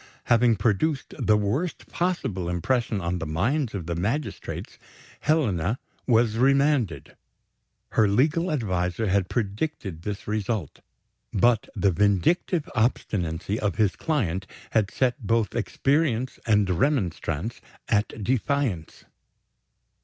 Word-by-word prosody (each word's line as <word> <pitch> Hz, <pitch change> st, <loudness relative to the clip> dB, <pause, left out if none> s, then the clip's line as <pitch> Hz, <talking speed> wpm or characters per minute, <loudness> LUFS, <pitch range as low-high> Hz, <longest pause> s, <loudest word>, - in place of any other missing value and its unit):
Having 120 Hz, -1 st, +4 dB
produced 130 Hz, +8 st, 0 dB
the 105 Hz, -1 st, +4 dB
worst 110 Hz, -, -1 dB
possible 130 Hz, -, -1 dB
impression 110 Hz, +5 st, 0 dB
on 85 Hz, +1 st, -2 dB
the 80 Hz, -, -4 dB
minds 110 Hz, -, 0 dB
of 90 Hz, -5 st, -4 dB
the 85 Hz, -, -2 dB
magistrates, 110 Hz, -, -3 dB, 0.4 s
Helena 115 Hz, -, +1 dB, 0.3 s
was 115 Hz, -2 st, +3 dB
remanded. 135 Hz, -, +2 dB, 0.7 s
Her 110 Hz, -2 st, +3 dB
legal 155 Hz, -, +2 dB
adviser 95 Hz, -5 st, -1 dB
had 95 Hz, -1 st, +1 dB
predicted 100 Hz, -, -3 dB
this 100 Hz, +2 st, -5 dB
result; 105 Hz, -5 st, -2 dB, 0.5 s
but 115 Hz, +2 st, +2 dB
the 100 Hz, -, +3 dB
vindictive 105 Hz, -, +2 dB
obstinacy 105 Hz, -5 st, 0 dB
of 105 Hz, -, -1 dB
his 105 Hz, -4 st, +2 dB
client 95 Hz, -, -1 dB, 0.2 s
had 105 Hz, -3 st, +2 dB
set 130 Hz, +1 st, 0 dB
both 115 Hz, -2 st, +1 dB
experience 130 Hz, +1 st, 0 dB
and 105 Hz, -2 st, +4 dB
remonstrance 95 Hz, -, -1 dB, 0.3 s
at 105 Hz, 0 st, 0 dB
defiance. 125 Hz, -, -1 dB
110 Hz, 110 wpm, -25 LUFS, 95-130 Hz, 0.7 s, Having